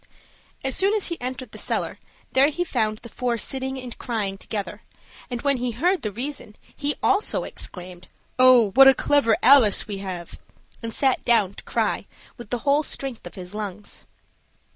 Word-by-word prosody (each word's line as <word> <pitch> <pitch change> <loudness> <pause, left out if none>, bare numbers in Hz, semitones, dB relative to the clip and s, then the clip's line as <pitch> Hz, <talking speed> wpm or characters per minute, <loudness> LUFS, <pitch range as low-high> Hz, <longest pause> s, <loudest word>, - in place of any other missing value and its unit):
As 265 0 -1
soon 395 +3 +2
as 420 - 0
he 340 - -5
entered 255 +1 -5
the - - -8
cellar, - - -2 0.3
there 270 +2 +5
he 350 +4 -2
found 220 -9 0
the 235 - -11
four 240 +1 -2
sitting 265 +3 -2
and 250 -2 -8
crying 210 -5 -2
together, 200 +1 -5 0.5
and 245 -2 -5
when 280 -2 +2
he 250 0 -2
heard 345 - +1
the 215 - -2
reason, 240 0 -5 0.2
he 290 0 -2
also 405 +2 +2
exclaimed, 180 0 -8 0.3
"Oh, 250 -5 +6
what 270 +5 +8
a 270 - +8
clever 275 -7 +3
Alice 250 -6 +6
we 200 -2 -5
have!" 185 -3 -7 0.4
and 230 -1 -5
sat 265 +2 +1
down 210 -5 +3
to - - -12
cry - - -1 0.3
with 240 -4 -11
the 245 - -1
whole 285 +1 +4
strength 270 -5 -4
of - - -12
his 180 -1 -8
lungs. 210 -1 -6
245 Hz, 180 wpm, -24 LUFS, 210-275 Hz, 0.5 s, what